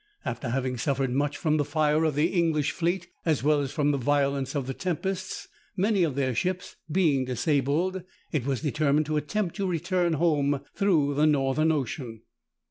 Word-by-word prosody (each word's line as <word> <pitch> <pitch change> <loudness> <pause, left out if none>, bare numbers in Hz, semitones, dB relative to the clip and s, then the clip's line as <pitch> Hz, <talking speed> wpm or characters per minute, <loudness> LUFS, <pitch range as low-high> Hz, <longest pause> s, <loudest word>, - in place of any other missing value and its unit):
After 115 0 -3
having 130 0 -1
suffered 135 0 0
much 145 +3 0
from 155 -2 +1
the 145 - +2
fire 155 +1 +1
of 155 -3 0
the 150 +4 +2
English 160 -5 +2
fleet, 175 +1 -1 0.2
as 155 -6 +1
well 150 0 +3
as 135 -2 -3
from 145 -2 +1
the 140 - 0
violence 140 0 0
of 140 -3 -1
the 135 - -3
tempests, 185 +4 -3 0.3
many 200 +1 +2
of 155 -6 +1
their 130 -2 0
ships 180 +9 -2 0.2
being 155 -6 +3
disabled, 145 +8 0 0.3
it 150 -6 0
was 135 0 -1
determined 150 0 +1
to 155 +1 -1
attempt 175 +4 -2
to 195 -2 -1
return 175 0 0
home 145 -3 +1
through 165 -8 +2
the 150 +2 +3
Northern 150 +2 +2
Ocean. 125 -6 -3
150 Hz, 180 wpm, -27 LUFS, 140-170 Hz, 0.3 s, well